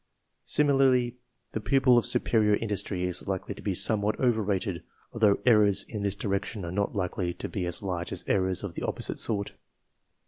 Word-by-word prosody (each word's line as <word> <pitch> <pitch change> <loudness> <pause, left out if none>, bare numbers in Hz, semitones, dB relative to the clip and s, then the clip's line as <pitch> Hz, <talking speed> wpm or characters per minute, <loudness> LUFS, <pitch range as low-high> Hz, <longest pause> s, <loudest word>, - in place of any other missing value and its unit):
Similarly, 130 -4 +3 0.3
the 110 - -4
pupil 135 +1 +4
of 120 - +3
superior 105 -3 +2
industry 100 -4 -2
is 90 -1 -1
likely 95 +1 -3
to - - -12
be 100 -3 -2
somewhat 105 +2 +2
over 120 -4 +2
rated, 95 -3 -2 0.3
although 105 -3 +3
errors 105 -5 +4
in 105 -3 -5
this 100 -1 0
direction 100 0 -3
are 85 - -5
not 100 +3 -1
likely 90 -2 -2
to - - -5
be 90 -3 -3
as 85 +3 -1
large 90 -3 -3
as - - -5
errors 95 -1 0
of 100 -4 -5
the - - -6
opposite - - -3
sort. 100 -3 -2
100 Hz, 180 wpm, -28 LUFS, 95-115 Hz, 0.3 s, pupil